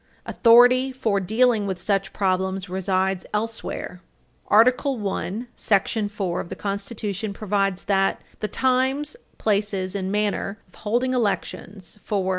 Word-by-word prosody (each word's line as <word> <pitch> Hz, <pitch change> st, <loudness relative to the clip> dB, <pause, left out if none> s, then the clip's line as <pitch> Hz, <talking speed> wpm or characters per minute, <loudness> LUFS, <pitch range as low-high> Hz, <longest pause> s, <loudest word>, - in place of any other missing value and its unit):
Authority 245 Hz, +3 st, +5 dB
for 225 Hz, -6 st, 0 dB
dealing 220 Hz, +2 st, +2 dB
with 190 Hz, -2 st, -3 dB
such 195 Hz, +1 st, 0 dB
problems 190 Hz, 0 st, -1 dB
resides 190 Hz, 0 st, 0 dB
elsewhere. 215 Hz, -4 st, -4 dB, 0.5 s
Article 250 Hz, +5 st, +4 dB
I, 195 Hz, +4 st, -3 dB
§ 205 Hz, +1 st, +1 dB
4 190 Hz, -4 st, -2 dB
of -, -, -10 dB
the -, -, -5 dB
Constitution 200 Hz, 0 st, -4 dB
provides 195 Hz, -2 st, -1 dB
that 195 Hz, -1 st, +1 dB, 0.2 s
"The 215 Hz, -, -1 dB
Times, 265 Hz, -, 0 dB, 0.2 s
Places 200 Hz, -3 st, 0 dB
and 190 Hz, -1 st, -3 dB
Manner 205 Hz, -1 st, -1 dB
of -, -, -29 dB
holding 240 Hz, +4 st, -1 dB
Elections 205 Hz, -4 st, -3 dB
for 195 Hz, -3 st, -1 dB
205 Hz, 125 wpm, -23 LUFS, 195-230 Hz, 0.5 s, Authority